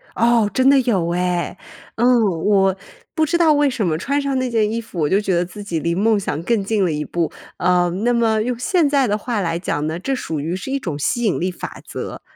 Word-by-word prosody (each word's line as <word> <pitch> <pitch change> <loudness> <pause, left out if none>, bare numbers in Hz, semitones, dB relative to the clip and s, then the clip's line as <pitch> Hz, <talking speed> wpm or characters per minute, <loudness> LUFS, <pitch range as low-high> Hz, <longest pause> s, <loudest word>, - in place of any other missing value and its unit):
哦， 230 -2 +3
真 260 +1 +4
的 275 -1 +6
有 195 -9 0
哎。 180 0 -1 0.4
嗯， 235 - +2 0.4
我 195 -2 +3 0.4
不 315 -3 +2
知 340 +3 +1
道 325 -3 +5
为 290 -1 +3
什 225 -6 -2
么 155 -2 0
穿 280 - -1
上 275 -1 -1
那 255 -1 -1
件 220 -2 +1
衣 230 - -1
服， 205 -6 -8
我 150 - +1
就 195 - +3
觉 200 -2 -1
得 175 - +2
自 195 +4 -9
己 170 -5 -2
离 170 +2 -1
梦 210 +3 +2
想 160 -5 -3
更 225 0 +1
近 205 0 0
了 165 - 0
一 150 0 -2
步， 170 +2 -2 0.3
呃， 180 -1 +2
那 245 +1 +2
么 225 -2 +2
用 245 +1 -2
现 330 - +2
在 280 -2 +2
的 210 0 0
话 225 -2 -2
来 170 -1 -1
讲 150 -4 -2
呢， 160 +2 -3
这 270 +8 -2
属 160 - -4
于 165 +5 -2
是 230 +8 -6
一 275 - 0
种 165 - -4
吸 240 - -1
引 210 - +1
力 185 +2 -1
法 - - -8
则。 - - -6
210 Hz, 265 characters per minute, -20 LUFS, 175-245 Hz, 0.4 s, 的